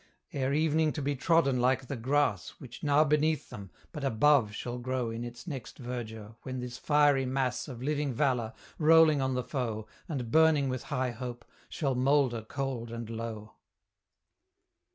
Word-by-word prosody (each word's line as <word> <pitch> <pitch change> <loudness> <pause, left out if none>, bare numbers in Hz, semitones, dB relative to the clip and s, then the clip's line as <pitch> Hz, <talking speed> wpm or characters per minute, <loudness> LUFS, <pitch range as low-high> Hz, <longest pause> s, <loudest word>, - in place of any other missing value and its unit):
Ere 135 -1 0
evening 155 +1 +2
to 155 - -5
be 145 +1 0
trodden 140 -2 +2
like 130 +1 +2
the 140 - -4
grass 125 -5 0
Which 120 -3 -11
now 145 +1 +4
beneath 150 0 +1
them, 100 -5 -8 0.2
but 150 -4 -6
above 135 -2 +3
shall 120 +3 -5
grow 125 -1 -2
In 115 +1 -5
its 120 0 -8
next 135 -8 -7
verdure, 115 -4 -6
when 130 -1 -5
this 125 0 -6
fiery 145 -3 +3
mass 130 +1 -1
Of 125 -3 -8
living 145 0 0
valour, 125 -3 0 0.3
rolling 160 -2 +6
on 130 -1 0
the 125 - -1
foe, 115 -6 -3 0.2
And 125 -7 -4
burning 160 -3 +4
with 130 -1 -4
high 130 -4 -1
hope, 120 0 -7 0.2
shall 140 -4 -1
moulder 130 -2 +2
cold 125 0 -4
and 115 -1 -6
low. 110 -2 -6
130 Hz, 165 wpm, -30 LUFS, 120-145 Hz, 0.3 s, rolling